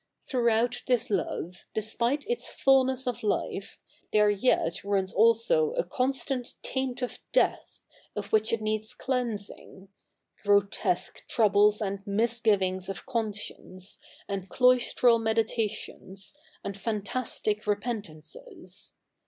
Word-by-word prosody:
Thr'oughout 235 -1 +2
this 245 -1 +2
love, 180 -2 -2
despite 235 +6 0
its 480 +1 -2
fuhiess 265 -1 +3
of 245 -3 -2
life, 200 -1 -2 0.3
the7 210 -1 +5
e - - +2
yet 195 -6 +1
runs 195 -2 0
also 230 - +4
a - - +1
constant 260 -1 -2
taint 265 -1 -2
of 250 - -4
death, - - +1 0.3
of 205 -1 -5
ivhich 220 0 +3
it 230 -1 0
needs 215 0 -2
cleansi7ig 215 -6 -4 0.2
— - - -35
g7'otesque 200 -1 +1
tr 230 - +1
oubles 210 +1 +5
and 195 0 -4
77iisgivings 200 -4 +1
of 195 - -5
conscience, 210 -5 -4 0.3
a7id 195 -2 -3
cloist7'al 250 0 +4
77ieditations, 220 -2 -2 0.3
and 200 - -4
fa7i 210 -2 -3
last 255 -3 -1
ic 210 0 +2
7'epen 210 +2 -1
fauces. 205 - -9
220 Hz, 125 wpm, -28 LUFS, 200-250 Hz, 0.3 s, the7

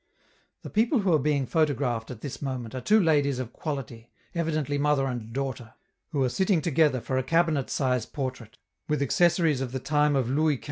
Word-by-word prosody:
The - - -8
people 230 +3 +2
who 190 -3 +2
are 155 - +4
being 140 -1 +1
photographed 135 -7 0
at 120 -3 -8
this 140 - -6
moment 130 -5 -4
are 130 - -4
two 215 - +4
ladies 145 -7 +2
of 125 -2 -5
quality, 125 -6 -6 0.2
evidently 155 -4 -1
mother 145 -1 +2
and 120 -4 -4
daughter, 130 -3 -4 0.3
who 145 -5 0
are 130 - +2
sitting 190 - +2
together 155 -4 +2
for 130 +2 -2
a - - -1
cabinet 165 -2 +1
size 125 -4 0
portrait, 130 -5 -6 0.3
with 150 -1 +1
accessories 165 -1 +2
of 130 -1 -4
the 130 - -2
time 150 +1 +2
of 130 -4 +1
Louis 150 +3 +2
XV. - - -9
140 Hz, 195 wpm, -27 LUFS, 130-155 Hz, 0.3 s, are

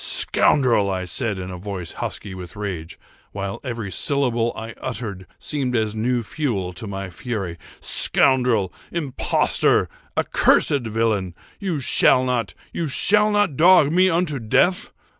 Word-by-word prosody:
"Scoundrel!" 115 -7 +3
I 95 -1 -2
said, 100 +3 -1
in 95 0 -6
a 90 - -6
voice 90 -2 -6
husky 95 - -6
with 90 -1 -9
rage, 95 -6 -6 0.4
while 100 -1 -4
every 115 -6 -5
syllable 120 -2 +1
I 115 +1 -7
uttered 105 -7 -6
seemed 135 -5 -2
as 110 -2 0
new 120 +2 -1
fuel 100 -8 -3
to 100 +5 -8
my 100 -1 -6
fury, 95 -4 -5 0.2
"scoundrel! 125 -8 +3 0.2
impostor! 150 -6 +1 0.3
accursed 135 -5 +2
villain! 105 -5 -1 0.2
you 190 -6 -2
shall 130 -1 +4
not—you 125 - -3
shall 210 +9 +3
not 205 -8 +1
dog 170 -1 +5
me 185 +2 +4
unto 165 -5 0
death! 180 - +1
115 Hz, 135 wpm, -22 LUFS, 100-140 Hz, 0.4 s, dog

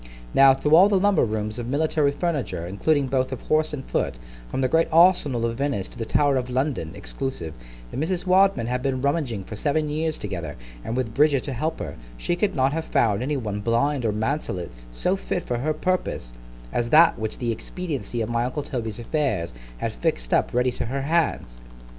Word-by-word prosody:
Now, 135 -1 +7
through 150 +3 0
all 190 +5 +7
the 200 - +3
lumber 205 0 +3
rooms 110 0 -2
of 120 - -4
military 145 +1 +1
furniture, 145 - -2
including 140 - +1
both 130 0 0
of 130 - -5
horse 155 0 +1
and 140 -3 -6
foot, - - -1 0.3
from 135 - -2
the 130 - +3
great 165 +5 +3
arsenal 160 -8 +4
of 115 0 -2
Venice 135 -9 -1
to - - -13
the 115 - -2
Tower 145 -2 +3
of 125 0 -2
London 130 - -1
(exclusive), 80 - -5 0.4
if - - -4
Mrs. 175 +4 -1
Wadman 190 -8 +4
had 125 +1 -1
been 130 -1 -1
rummaging 140 - 0
for 110 - -8
seven 150 +6 0
years 155 +1 -1
together, 85 -7 -5 0.3
and 115 - -3
with 120 -4 -2
Bridget 145 -2 +3
to 140 - -3
help 155 +6 -2
her, - - -6 0.2
she 175 - -1
could 195 +3 0
not 135 0 +2
have 160 0 -2
found 105 -2 +2
any 145 +3 -1
one 105 -5 -3
blind 120 +6 +1
or 110 - +1
mantelet 105 - -2 0.2
so 180 - 0
fit 185 -2 -3
for 120 -1 -2
her 155 +5 0
purpose, 155 - -2 0.4
as 120 0 0
that 165 +1 +6
which 110 0 -3
the 120 -2 -1
expediency 140 - -4
of 110 - -2
my 120 0 +1
uncle 135 +4 -3
Toby's 115 -7 -4
affairs 120 - -1 0.2
had - - -2
fix'd - - -2
up - - +2
ready 125 +1 +2
to 120 - -4
her 135 +3 -2
hands. 150 - 0
130 Hz, 205 wpm, -24 LUFS, 115-155 Hz, 0.4 s, Now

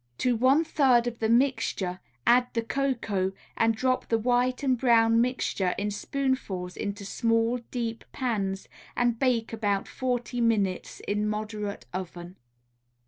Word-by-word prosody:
To 250 -1 +1
one 260 +7 +4
third 265 -7 +3
of 240 -1 -4
the 220 - 0
mixture 230 -7 +1 0.3
add 245 +1 +5
the 230 - +1
cocoa, 225 -7 -1 0.2
and 225 0 +2
drop 255 +3 0
the 230 - +3
white 250 +3 +1
and 260 -2 +3
brown 230 -2 +4
mixture 235 -7 0
in 205 +1 -1
spoonfuls 205 -7 -2
into 200 0 -4
small, 230 +3 +1
deep 230 -2 -3
pans, 200 -7 -2 0.3
and 240 -2 +1
bake 240 -4 +1
about 205 -3 0
forty 245 -1 -2
minutes 205 -5 0
in 210 +1 -1
moderate 210 - -4
oven. 180 0 -6
230 Hz, 140 wpm, -27 LUFS, 205-250 Hz, 0.3 s, add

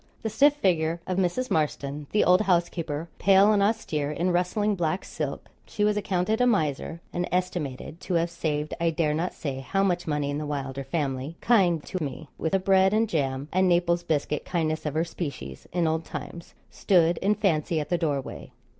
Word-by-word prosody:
The 220 - -2
stiff 285 +6 +4
figure 170 - +1
of 185 0 -1
Mrs. 195 +8 0
Marston, 145 -1 -1
the 210 - +3
old 180 +2 +5
housekeeper, 170 -5 0
pale 195 +2 +5
and 205 - +3
austere, 200 -9 0
in 170 +4 0
rustling 180 +4 +1
black 175 -1 -1
silk - - -5 0.2
(she 210 - -2
was 210 0 +3
accounted 200 +2 0
a 250 - +4
miser, 160 - 0
and 175 0 -2
estimated 175 -3 -3
to 180 - -2
have 170 0 +1
saved 155 -3 -2
I 170 - +3
dare 155 -2 0
not 165 +4 -2
say 140 -4 -4
how 195 +9 0
much 175 -3 0
money 150 -2 -1
in 145 - -2
the 150 - -4
Wylder 135 -2 -4
family 135 +1 -3
kind 180 -9 +3
to 185 -3 -4
me 145 +2 -6
with 160 - -2
the 195 - +4
bread 190 +1 +4
and 225 +1 +2
jam 140 -6 -1
and 185 0 +3
Naples 175 0 +2
biscuit 150 -2 -1
kindness 155 -3 -1
of 150 - -3
her 160 +2 +1
species, 140 - -6
in 175 -1 +1
old 160 0 0
times) 170 +1 -8 0.2
stood 175 -3 +2
in 205 +2 +2
fancy 165 -6 +1
at 150 - -4
the 175 - +2
doorway. 145 -5 -3
170 Hz, 195 wpm, -26 LUFS, 150-190 Hz, 0.2 s, old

